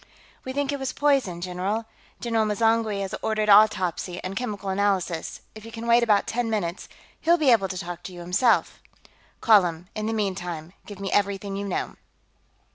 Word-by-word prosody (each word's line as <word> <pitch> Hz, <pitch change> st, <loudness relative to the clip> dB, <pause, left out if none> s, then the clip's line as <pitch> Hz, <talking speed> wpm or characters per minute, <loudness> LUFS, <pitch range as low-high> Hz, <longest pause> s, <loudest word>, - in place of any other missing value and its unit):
"We 260 Hz, -, -5 dB
think 285 Hz, +1 st, -1 dB
it 285 Hz, -, -3 dB
was 265 Hz, -1 st, -3 dB
poison, 270 Hz, -12 st, +1 dB
general. 185 Hz, +5 st, -2 dB, 0.3 s
General 230 Hz, -2 st, 0 dB
M'zangwe 220 Hz, -1 st, +1 dB
has 195 Hz, -1 st, -4 dB
ordered 215 Hz, -1 st, 0 dB
autopsy 190 Hz, -4 st, +4 dB
and 185 Hz, +1 st, -5 dB
chemical 205 Hz, -4 st, -4 dB
analysis. 190 Hz, -4 st, -1 dB
If 215 Hz, -, -12 dB
you 225 Hz, -, -10 dB
can 230 Hz, 0 st, -7 dB
wait 235 Hz, +1 st, +5 dB
about 210 Hz, -4 st, +3 dB
ten 240 Hz, 0 st, -2 dB
minutes, 195 Hz, -5 st, -3 dB, 0.3 s
he'll 340 Hz, +2 st, +3 dB
be 295 Hz, -6 st, +4 dB
able 205 Hz, -5 st, +4 dB
to 185 Hz, 0 st, -5 dB
talk 175 Hz, -1 st, -6 dB
to -, -, -6 dB
you, 175 Hz, -1 st, -9 dB
himself." 185 Hz, +7 st, +2 dB, 0.6 s
"Call 215 Hz, -4 st, +6 dB
him. 175 Hz, +1 st, -5 dB
In 215 Hz, 0 st, -3 dB
the 225 Hz, -, -1 dB
meantime, 180 Hz, -5 st, -3 dB
give 205 Hz, -2 st, -9 dB
me 195 Hz, -1 st, -4 dB
everything 200 Hz, -1 st, 0 dB
you 200 Hz, +1 st, -4 dB
know." 195 Hz, -, -3 dB
205 Hz, 185 wpm, -25 LUFS, 185-225 Hz, 0.6 s, Call